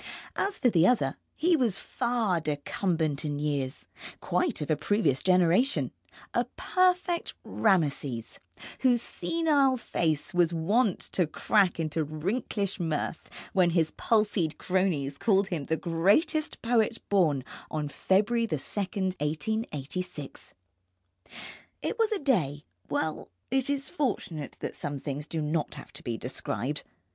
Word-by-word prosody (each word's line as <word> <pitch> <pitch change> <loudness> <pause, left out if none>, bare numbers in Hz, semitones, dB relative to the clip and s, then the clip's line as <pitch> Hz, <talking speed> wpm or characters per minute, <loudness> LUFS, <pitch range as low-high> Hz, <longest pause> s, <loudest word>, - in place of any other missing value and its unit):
As 395 0 0
for 250 -4 +3
the 175 -1 +5
other, 245 -2 +2 0.2
he 345 +2 +3
was 240 - +1
far 235 -7 0
decumbent 155 +1 -1
in 145 -2 -2
years, 145 -2 -2 0.3
quite 345 -9 0
of 150 +1 -2
a - - +4
previous 150 - +1
generation, 185 +8 +3 0.4
a - - +2
perfect 360 -1 +1
Rameses, 145 - 0 0.4
whose 250 -2 +4
senile 285 -1 +2
face 160 -8 -1
was 175 -1 +3
wont 200 +5 +2
to 180 -4 +2
crack 185 +3 +2
into 160 0 0
wrinklish 195 - -2
mirth 160 -1 -2 0.2
when 185 -3 +4
his 165 -2 +2
palsied 210 -8 +1
cronies 170 -7 0
called 195 -3 +3
him 160 -6 -2
the 160 - 0
greatest 205 - +1
poet 230 -1 +2
born 160 -10 +3 0.3
on 150 -1 -2
February 215 +9 +2
2, 160 - 0
1886. 180 - -3 1.3
It 460 - -2
was 450 -1 +3
a 430 - +1
day 170 - +1 0.3
well, 155 -1 -2 0.2
it 265 +1 +1
is 280 -1 -1
fortunate 200 - -3
that - - -4
some 145 0 -4
things 145 +2 -5
do 160 -2 -2
not 150 +1 -1
have - - -11
to - - -10
be 120 -4 -3
described. 125 +3 -3
180 Hz, 130 wpm, -28 LUFS, 150-235 Hz, 1.3 s, the